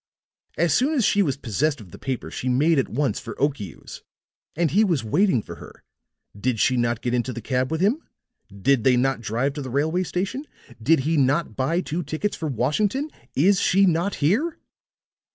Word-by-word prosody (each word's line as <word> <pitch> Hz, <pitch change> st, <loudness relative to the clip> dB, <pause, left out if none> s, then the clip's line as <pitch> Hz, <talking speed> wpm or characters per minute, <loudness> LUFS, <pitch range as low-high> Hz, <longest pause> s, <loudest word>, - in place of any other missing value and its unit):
As 170 Hz, -2 st, +2 dB
soon 285 Hz, +5 st, +2 dB
as 250 Hz, -7 st, +2 dB
she 205 Hz, -, +3 dB
was 140 Hz, -8 st, 0 dB
possessed 140 Hz, +4 st, -1 dB
of 100 Hz, -6 st, -13 dB
the -, -, -11 dB
paper 130 Hz, -2 st, -4 dB
she 130 Hz, -, -3 dB
made 145 Hz, +5 st, +3 dB
at 135 Hz, -, -1 dB
once 140 Hz, +4 st, -1 dB
for -, -, -8 dB
Okiu's. 135 Hz, -, -3 dB, 0.5 s
And 165 Hz, -1 st, +1 dB
he 210 Hz, +4 st, +4 dB
was 170 Hz, -, +1 dB
waiting 130 Hz, -, +2 dB
for -, -, -9 dB
her. -, -, -13 dB, 0.5 s
Did 115 Hz, +2 st, -1 dB
she 130 Hz, -, +3 dB
not 120 Hz, -2 st, 0 dB
get 120 Hz, -, -2 dB
into 125 Hz, +1 st, 0 dB
the 120 Hz, -, -6 dB
cab 125 Hz, +3 st, -1 dB
with 160 Hz, +1 st, -2 dB
him? 225 Hz, -, +2 dB, 0.5 s
Did 115 Hz, +5 st, +1 dB
they 125 Hz, -1 st, +4 dB
not 135 Hz, -1 st, +1 dB
drive 120 Hz, +6 st, -1 dB
to 145 Hz, -, -5 dB
the 130 Hz, -, -6 dB
railway 155 Hz, +7 st, 0 dB
station? 190 Hz, -, -3 dB, 0.3 s
Did 150 Hz, +5 st, +3 dB
he 160 Hz, +4 st, 0 dB
not 140 Hz, -3 st, +1 dB
buy 160 Hz, +7 st, 0 dB
two 170 Hz, 0 st, -3 dB
tickets 175 Hz, +5 st, -3 dB
for 160 Hz, -, -4 dB
Washington? 205 Hz, -, 0 dB, 0.2 s
Is 185 Hz, +6 st, +4 dB
she 195 Hz, +2 st, +4 dB
not 180 Hz, +2 st, +1 dB
here?" 260 Hz, -, +1 dB
145 Hz, 195 wpm, -24 LUFS, 125-180 Hz, 0.5 s, he